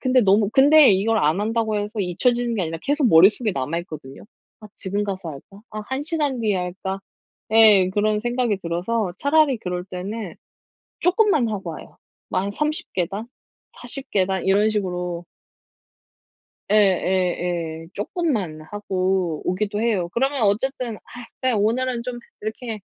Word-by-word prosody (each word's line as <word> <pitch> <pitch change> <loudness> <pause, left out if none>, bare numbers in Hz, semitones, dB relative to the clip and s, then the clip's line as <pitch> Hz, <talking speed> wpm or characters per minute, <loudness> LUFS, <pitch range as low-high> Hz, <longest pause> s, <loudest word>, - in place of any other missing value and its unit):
근데 255 -1 +3
너무 205 0 +3
근데 290 +1 +7
이걸 220 +4 +2
안 155 +4 +2
한다고 220 0 0
해서 205 0 -2
잊혀지는 235 +6 0
게 195 - -1
아니라 165 0 -3
계속 285 -2 +2
머릿속에 205 +6 +5
남아 145 +4 -2
있거든요. 150 -6 -10 0.4
'아 215 - -11
지금 200 +1 -2
가서 190 -4 -4
할까? 175 +7 -12
아 215 - -5
1 265 +2 -2
시간 295 -5 -1
뒤에 210 -4 +1
할까?' 190 +2 -4 0.5
예. 215 -4 +7
그런 210 +1 +1
생각이 240 -3 0
들어서 180 +3 -2
차라리 285 -2 +3
그럴 180 -3 -4
때는 195 +2 -6 0.7
조금만 360 - +3
하고 195 -5 -4
와요. 155 - -11 0.3
뭐 - - 0
한 200 +1 -3
30 300 - -3
계단? 195 +5 -2 0.5
40 265 +3 -7
계단? 190 -1 +1
이런 205 +3 +3
식으로 180 -4 -3 1.5
예예예. 180 -4 +1
조금만 205 - -2
하고 185 -5 -1
오기도 205 +3 -1
해요. 210 -7 0
그러면 270 +1 0
어쨌든 235 +3 0
'아 - - -18 0.4
그래 255 -1 +1
오늘은 235 +3 0
좀 250 -1 -5 0.2
이렇게 220 +1 -5
205 Hz, 290 characters per minute, -22 LUFS, 185-240 Hz, 1.5 s, 근데